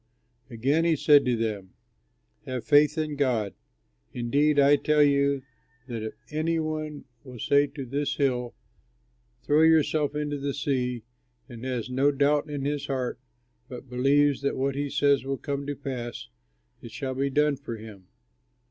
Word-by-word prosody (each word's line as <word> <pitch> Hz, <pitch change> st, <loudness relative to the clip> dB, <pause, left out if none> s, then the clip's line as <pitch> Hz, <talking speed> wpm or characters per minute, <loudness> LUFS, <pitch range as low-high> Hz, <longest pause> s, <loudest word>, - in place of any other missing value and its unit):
Again 135 Hz, +7 st, +1 dB
he 165 Hz, -1 st, +3 dB
said 145 Hz, 0 st, +5 dB
to 125 Hz, -1 st, +2 dB
them, 105 Hz, -5 st, -3 dB, 0.7 s
"Have 130 Hz, -2 st, -4 dB
faith 150 Hz, +2 st, +4 dB
in 155 Hz, -2 st, -2 dB
God. 120 Hz, -8 st, 0 dB, 0.6 s
Indeed 145 Hz, +5 st, +1 dB
I 140 Hz, +1 st, +6 dB
tell 150 Hz, 0 st, +3 dB
you 140 Hz, -1 st, +2 dB, 0.4 s
that 115 Hz, -3 st, -5 dB
if 110 Hz, 0 st, -6 dB, 0.2 s
any 160 Hz, +2 st, 0 dB
one 155 Hz, -2 st, -4 dB, 0.2 s
will 125 Hz, -3 st, -11 dB
say 140 Hz, +5 st, +3 dB
to 140 Hz, -1 st, -7 dB
this 140 Hz, +3 st, -2 dB
hill, 125 Hz, -4 st, -1 dB, 0.9 s
'Throw 150 Hz, +4 st, +3 dB
yourself 155 Hz, -2 st, +3 dB
into 145 Hz, -1 st, -2 dB
the 140 Hz, 0 st, -3 dB
sea,' 125 Hz, -4 st, -1 dB, 0.4 s
and 120 Hz, -3 st, -10 dB
has 125 Hz, -3 st, -3 dB
no 135 Hz, +3 st, +3 dB
doubt 145 Hz, +2 st, +1 dB
in 145 Hz, -2 st, -4 dB
his 145 Hz, 0 st, -2 dB
heart 130 Hz, -3 st, -3 dB, 0.5 s
but 125 Hz, 0 st, -10 dB
believes 140 Hz, +3 st, +2 dB
that 140 Hz, -, -1 dB
what 135 Hz, +1 st, 0 dB
he 140 Hz, +1 st, -3 dB
says 140 Hz, -1 st, +2 dB
will 135 Hz, 0 st, -3 dB
come 140 Hz, 0 st, -4 dB
to 145 Hz, -, -3 dB
pass, 125 Hz, -4 st, -6 dB, 0.5 s
it 115 Hz, -, -9 dB
shall 130 Hz, +3 st, -4 dB
be 135 Hz, +2 st, -1 dB
done 150 Hz, +1 st, +2 dB
for 130 Hz, -4 st, -7 dB
him. 105 Hz, -4 st, -12 dB
140 Hz, 160 wpm, -26 LUFS, 125-145 Hz, 0.9 s, I